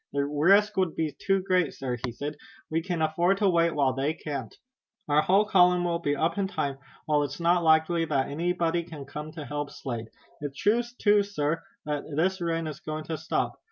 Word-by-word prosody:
"The 140 0 +1
risk 190 +9 +3
would 185 -4 +1
be 160 -2 -2
too 195 -1 +1
great, 185 -5 +1
sir," 130 -2 -3
he 125 - -2
said. 145 +5 -5 0.4
"We 165 +1 +1
can 175 -2 -2
afford 170 +5 +2
to 200 - +2
wait 170 -2 +3
while 135 -3 +2
they 140 +4 -1
can't. 140 -9 -6 0.5
Our 150 0 +4
whole 195 +6 +4
column 180 -3 +4
will 170 -1 0
be 145 -3 0
up 165 +6 0
in 195 - +1
time, 140 -8 -3 0.3
while 150 -1 +2
it's 145 +1 -3
not 170 +1 +3
likely 160 +1 +3
that 135 -4 0
anybody 170 +2 0
can 160 -4 -9
come 150 +2 -7
to 155 -3 -7
help 145 0 -4
Slade. 115 -4 -6 0.3
It's 145 -2 -6
true 220 +4 +3 0.2
too, 205 -1 +4
sir, 165 -6 -1 0.2
that 150 -1 -2
this 185 +4 +1
rain 165 -1 -1
is 155 -2 -6
going 155 -1 -5
to 160 0 -4
stop. - - -2
160 Hz, 205 wpm, -27 LUFS, 145-180 Hz, 0.5 s, Our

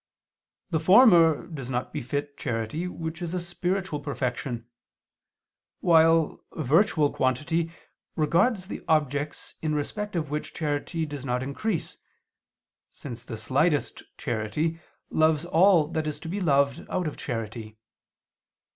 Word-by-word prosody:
The 160 - +2
former 170 - +6
does 135 -7 -7
not 125 0 -3
befit 145 +1 -3
charity 115 +7 -3
which 160 -1 -6
is 175 +1 -3
a - - 0
spiritual 175 -1 -2
perfection, 130 -4 -3 1.1
while 165 -1 +4
virtual 155 - +3
quantity 150 +6 0 0.4
regards 185 +6 +2
the - - -6
objects 145 -1 0
in 155 -1 0
respect 210 +8 -3
of 155 -4 -2
which 150 0 -4
charity 155 +2 -2
does 145 -3 -7
not 125 -1 -1
increase, 165 +8 -3 0.9
since 120 -4 -8
the 115 -2 -7
slightest 140 +7 +1 0.2
charity 120 +9 -2 0.3
loves 155 0 +3
all 175 -1 +5
that 160 -2 -2
is 150 - -4
to - - -7
be 195 +5 -3
loved 140 -5 +2
out 185 - -1
of 155 - -3
charity. 110 -2 -5
155 Hz, 125 wpm, -26 LUFS, 135-170 Hz, 1.1 s, former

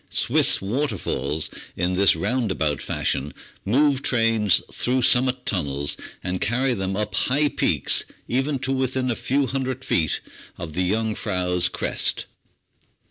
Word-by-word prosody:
Swiss - - +3
waterfalls, 95 - -2 0.2
in 90 +1 0
this 95 -1 +4
roundabout 90 - -1
fashion, 70 +3 -2 0.3
move 135 +5 +2
trains 115 -6 +3
through 125 +1 0
sum 125 +1 +6
mit 130 -1 -3
tunnels, 70 -7 -1 0.3
and 90 0 -3
carry 125 +4 +1
them 95 -2 -2
up 105 0 -2
high 145 +3 +2
peaks - - +1 0.2
even 135 +3 0
to 135 +1 -3
within 130 -1 0
a - - -1
few 135 +4 0
hundred 130 0 -3
feet 80 -2 +1 0.4
of 80 -2 -7
the 90 +2 0
Jungfrau's 95 -5 0
crest. - - 0
115 Hz, 135 wpm, -23 LUFS, 90-130 Hz, 0.4 s, sum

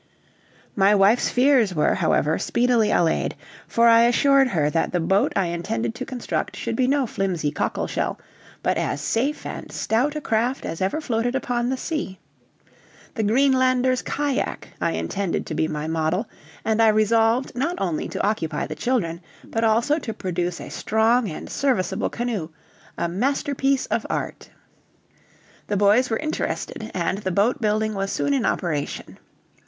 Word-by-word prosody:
My 200 +1 +4
wife's 205 +4 +4
fears 250 -7 +3
were, 150 - +3
however, 155 +2 +1
speedily 240 -3 +2
allayed, 165 -2 +1 0.3
for 235 0 +3
I 230 0 +7
assured 270 +3 +4
her 160 -11 +1
that 165 - 0
the 180 - 0
boat 190 +4 +2
I 195 - +2
intended 195 +7 -2
to 255 +2 -6
construct 255 -2 -3
should - - -3
be 255 -1 +2
no 275 0 +2
flimsy 180 -9 -1
cockle - - -2
shell, - - -2 0.5
but - - +1
as - - -1
safe 245 - -1
and - - -7
stout 255 +7 0
a - - -1
craft 245 0 -1
as 165 - -5
ever 195 +12 0
floated 245 -2 -1
upon 245 -2 -1
the 260 - -1
sea. 295 - -4 1.0
The 225 - -2
Greenlander's 255 +2 +3
cajack 285 -2 -2
I - - +1
intended 125 - -2
to - - -5
be 155 0 0
my 150 -1 -4
model, 160 +6 -1 0.4
and 220 0 +2
I 225 - +6
resolved 225 +3 +3
not 285 +8 -1
only 175 -5 -2
to - - -2
occupy 205 -7 -1
the - - -5
children, 170 -2 -1 0.2
but 225 - -3
also 235 +8 +2
to 225 -7 -6
produce 180 -1 -3
a - - -8
strong 220 +1 +1
and 155 - -7
serviceable 240 -10 0
canoe 230 -9 -3 0.5
a - - 0
masterpiece 270 +7 0
of - - -2
art. - - -4 1.2
The 205 - 0
boys 210 +6 +4
were 225 - 0
interested, 305 -7 -3
and 185 +2 -1
the 190 - -3
boat 210 +9 +1
building 215 0 +1
was 195 -1 -2
soon 285 - 0
in 265 -4 +1
operation. 150 -5 -3
225 Hz, 160 wpm, -23 LUFS, 185-255 Hz, 1.2 s, I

